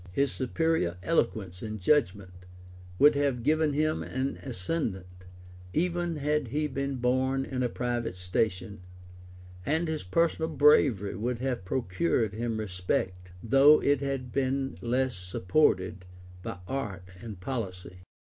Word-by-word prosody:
His 140 Hz, +6 st, +1 dB
superior 130 Hz, -, 0 dB
eloquence 105 Hz, -, 0 dB
and 110 Hz, -1 st, -5 dB
judgment 90 Hz, -6 st, 0 dB, 0.5 s
would 145 Hz, +6 st, +7 dB
have 140 Hz, -4 st, 0 dB
given 155 Hz, +1 st, +2 dB
him 155 Hz, +2 st, +1 dB
an 130 Hz, +2 st, -3 dB
ascendant, 90 Hz, -, -4 dB, 0.5 s
even 175 Hz, 0 st, 0 dB
had 150 Hz, -1 st, 0 dB
he 150 Hz, +6 st, -1 dB
been 140 Hz, -1 st, -2 dB
born 130 Hz, +2 st, +1 dB
in 130 Hz, -2 st, -3 dB
a 125 Hz, -, +1 dB
private 120 Hz, -4 st, -2 dB
station; 90 Hz, +1 st, -2 dB, 0.8 s
and 160 Hz, -, 0 dB
his 160 Hz, -1 st, -2 dB
personal 160 Hz, -, +1 dB
bravery 140 Hz, -, +4 dB
would 120 Hz, +5 st, -2 dB
have 125 Hz, -5 st, -3 dB
procured 95 Hz, -1 st, 0 dB
him 115 Hz, 0 st, -2 dB
respect, 90 Hz, -2 st, -2 dB
though 135 Hz, +6 st, +6 dB
it 145 Hz, -1 st, +2 dB
had 135 Hz, -3 st, -3 dB
been 135 Hz, 0 st, -1 dB
less 125 Hz, +1 st, 0 dB
supported 90 Hz, 0 st, 0 dB, 0.3 s
by 90 Hz, -, -5 dB
art 105 Hz, -9 st, -4 dB, 0.2 s
and 110 Hz, -5 st, -8 dB
policy. 90 Hz, -6 st, -5 dB
125 Hz, 130 wpm, -29 LUFS, 95-140 Hz, 0.8 s, would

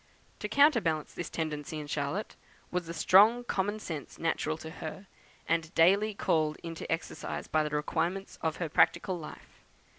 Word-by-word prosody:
To 210 Hz, -, -4 dB
counterbalance 225 Hz, -, +3 dB
this 175 Hz, -, -5 dB
tendency 155 Hz, 0 st, -4 dB
in 150 Hz, -, -6 dB
Charlotte, 145 Hz, +8 st, -3 dB, 0.4 s
was 175 Hz, -1 st, -2 dB
the 170 Hz, -, -5 dB
strong 210 Hz, +9 st, +6 dB
common 205 Hz, -3 st, -1 dB
sense 155 Hz, -9 st, -6 dB
natural 160 Hz, -1 st, -1 dB
to 160 Hz, 0 st, -8 dB
her, 190 Hz, +3 st, -7 dB, 0.4 s
and 165 Hz, -1 st, 0 dB
daily 200 Hz, +5 st, +4 dB
called 155 Hz, -5 st, +1 dB
into 165 Hz, -1 st, -6 dB
exercise 165 Hz, +1 st, -3 dB
by 155 Hz, -, +2 dB
the 150 Hz, -, -2 dB
requirements 175 Hz, +6 st, -2 dB
of 160 Hz, -1 st, 0 dB
her 170 Hz, -, -3 dB
practical 175 Hz, +4 st, +2 dB
life. 155 Hz, -, -12 dB
165 Hz, 155 wpm, -30 LUFS, 155-195 Hz, 0.4 s, strong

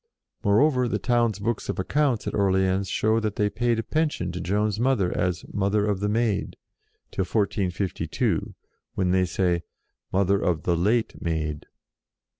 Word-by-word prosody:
Moreover 125 Hz, +5 st, +3 dB
the -, -, 0 dB
town's 120 Hz, -4 st, +1 dB
books 105 Hz, +2 st, -3 dB
of -, -, -2 dB
accounts, 130 Hz, +4 st, 0 dB
at -, -, -3 dB
Orleans, 95 Hz, -1 st, +1 dB
show 110 Hz, +4 st, +2 dB
that 110 Hz, -2 st, -2 dB
they 105 Hz, -1 st, +1 dB
paid 120 Hz, -1 st, +1 dB
a 115 Hz, -, -1 dB
pension 150 Hz, -, -1 dB
to 90 Hz, +1 st, -5 dB
Joan's 105 Hz, +4 st, 0 dB
mother 120 Hz, -8 st, +1 dB
as 90 Hz, -1 st, -1 dB
"Mother 100 Hz, +1 st, +1 dB
of 105 Hz, -2 st, 0 dB
the 105 Hz, +1 st, 0 dB
Maid," 110 Hz, -2 st, 0 dB, 0.5 s
till -, -, -2 dB
1452, 95 Hz, -1 st, -1 dB, 0.4 s
when 90 Hz, -2 st, +1 dB
they 95 Hz, 0 st, +3 dB
say 90 Hz, -1 st, 0 dB, 0.3 s
" -, -, -54 dB
Mother 100 Hz, +1 st, +2 dB
of 85 Hz, -3 st, 0 dB
the 85 Hz, -, +1 dB
late 110 Hz, +7 st, 0 dB
Maid." 80 Hz, -3 st, -2 dB
100 Hz, 160 wpm, -25 LUFS, 95-115 Hz, 0.5 s, Moreover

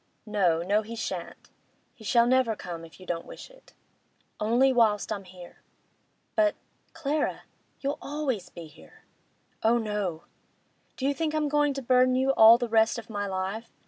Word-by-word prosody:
'No, 180 Hz, -6 st, +1 dB
no, 205 Hz, +4 st, +2 dB
he 225 Hz, +2 st, -8 dB
shan't. 230 Hz, -, -6 dB, 0.4 s
He 225 Hz, -, -16 dB
shall 235 Hz, +2 st, +4 dB
never 250 Hz, -2 st, +2 dB
come, 170 Hz, -4 st, -7 dB
if 165 Hz, +2 st, -14 dB
you 185 Hz, -, -12 dB
don't 170 Hz, -2 st, -4 dB
wish -, -, -11 dB
it.' -, -, -21 dB, 0.7 s
'Only 240 Hz, +5 st, +3 dB
whilst 220 Hz, -4 st, +2 dB
I'm 200 Hz, -2 st, -4 dB
here.' 180 Hz, -1 st, -14 dB, 0.7 s
'But—Clara—you'll 305 Hz, -2 st, -3 dB
always 280 Hz, -8 st, -3 dB
be 170 Hz, -, -10 dB
here.' 155 Hz, 0 st, -18 dB, 0.6 s
'Oh 230 Hz, +2 st, +3 dB
no! 210 Hz, -7 st, -3 dB, 0.7 s
Do 265 Hz, -, -3 dB
you 280 Hz, -, +2 dB
think 310 Hz, +1 st, -2 dB
I'm 305 Hz, -1 st, +1 dB
going 295 Hz, -1 st, +1 dB
to 275 Hz, -, -5 dB
burden 255 Hz, +1 st, +4 dB
you 265 Hz, +1 st, +2 dB
all 225 Hz, -2 st, +8 dB
the 240 Hz, -1 st, -2 dB
rest 225 Hz, +1 st, +3 dB
of 235 Hz, -1 st, -9 dB
my 205 Hz, -1 st, -3 dB
life? 195 Hz, +4 st, -4 dB
230 Hz, 160 wpm, -27 LUFS, 200-270 Hz, 0.7 s, all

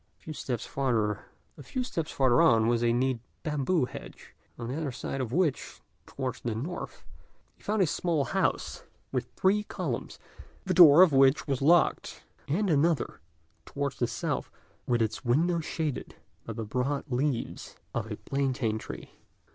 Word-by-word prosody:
A -, -, -30 dB
few 155 Hz, -, -6 dB
steps 125 Hz, -6 st, -4 dB
farther 130 Hz, -, -1 dB
on 115 Hz, -1 st, +5 dB
was 120 Hz, 0 st, +2 dB
a 120 Hz, -, +3 dB
neat 125 Hz, +1 st, +1 dB, 0.2 s
bamboo 150 Hz, +1 st, +1 dB
hedge, -, -, -11 dB, 0.2 s
on 120 Hz, -, -5 dB
the 125 Hz, -, -3 dB
other 155 Hz, -3 st, -2 dB
side 135 Hz, +2 st, -4 dB
of 120 Hz, -3 st, -3 dB
which, 155 Hz, -3 st, 0 dB, 0.3 s
towards 130 Hz, -2 st, -4 dB
the 115 Hz, -3 st, -2 dB
north, 150 Hz, +11 st, -6 dB, 0.5 s
he -, -, -29 dB
found 210 Hz, -1 st, +1 dB
a -, -, +4 dB
small 160 Hz, -1 st, 0 dB
house, -, -, -1 dB, 0.3 s
with 125 Hz, -2 st, -2 dB
three 200 Hz, +3 st, +3 dB
columns, 210 Hz, -, -4 dB, 0.5 s
the 185 Hz, -, 0 dB
door 170 Hz, -1 st, +9 dB
of 170 Hz, -6 st, +4 dB
which 135 Hz, +1 st, +5 dB
was 135 Hz, -2 st, -1 dB
locked; 165 Hz, +4 st, +3 dB, 0.2 s
and 195 Hz, +9 st, +1 dB
another, 155 Hz, -, +1 dB, 0.4 s
towards 140 Hz, -1 st, -4 dB
the 120 Hz, -, +2 dB
south, 120 Hz, -, -3 dB, 0.4 s
with 120 Hz, -2 st, +2 dB
its 110 Hz, -, -3 dB
window 165 Hz, +8 st, +2 dB
shaded 155 Hz, -3 st, -3 dB, 0.3 s
by 115 Hz, -, -4 dB
the 110 Hz, 0 st, -5 dB
broad 125 Hz, +6 st, -1 dB
leaves 125 Hz, -1 st, -2 dB, 0.2 s
of -, -, -3 dB
a -, -, -4 dB
plaintain 130 Hz, -5 st, -1 dB
tree. -, -, -9 dB
135 Hz, 155 wpm, -29 LUFS, 120-160 Hz, 0.5 s, door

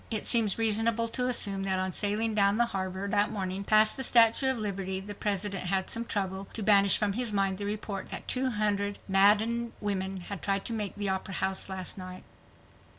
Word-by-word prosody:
It 220 Hz, -3 st, -3 dB
seems 225 Hz, -5 st, +4 dB
reasonable 225 Hz, +1 st, +2 dB
to 250 Hz, +2 st, -1 dB
assume 200 Hz, -5 st, +1 dB
that 190 Hz, -1 st, -1 dB
on 185 Hz, 0 st, -2 dB
sailing 215 Hz, +3 st, 0 dB
down 200 Hz, 0 st, +2 dB
the 240 Hz, -, +3 dB
harbor 190 Hz, -2 st, -4 dB
that 205 Hz, +1 st, +1 dB
morning 190 Hz, -2 st, -4 dB
past 215 Hz, +1 st, +4 dB
the 265 Hz, -, -1 dB
Statue 235 Hz, +2 st, +4 dB
of 260 Hz, -, -1 dB
Liberty 195 Hz, -3 st, -4 dB
the 205 Hz, +2 st, -8 dB
President 200 Hz, -2 st, -3 dB
had 190 Hz, +1 st, -1 dB
some 230 Hz, +1 st, +1 dB
trouble 195 Hz, -2 st, -3 dB
to 220 Hz, -, -5 dB
banish 200 Hz, -1 st, +5 dB
from 205 Hz, -2 st, -1 dB
his 240 Hz, +1 st, 0 dB
mind 195 Hz, -1 st, -1 dB
the 200 Hz, -, -4 dB
report 205 Hz, -2 st, -5 dB
that -, -, -7 dB
"two 260 Hz, 0 st, 0 dB
hundred 205 Hz, -2 st, -1 dB
maddened 215 Hz, +4 st, +2 dB
women" 195 Hz, -2 st, -3 dB
had 195 Hz, +1 st, -8 dB
tried 195 Hz, -1 st, -2 dB
to 230 Hz, -, -3 dB
"make 210 Hz, -3 st, -3 dB
the 205 Hz, -1 st, -2 dB
Opera 190 Hz, 0 st, -3 dB
House 190 Hz, 0 st, -2 dB
last 190 Hz, 0 st, -2 dB
night." 185 Hz, 0 st, -9 dB
205 Hz, 205 wpm, -28 LUFS, 195-220 Hz, -, banish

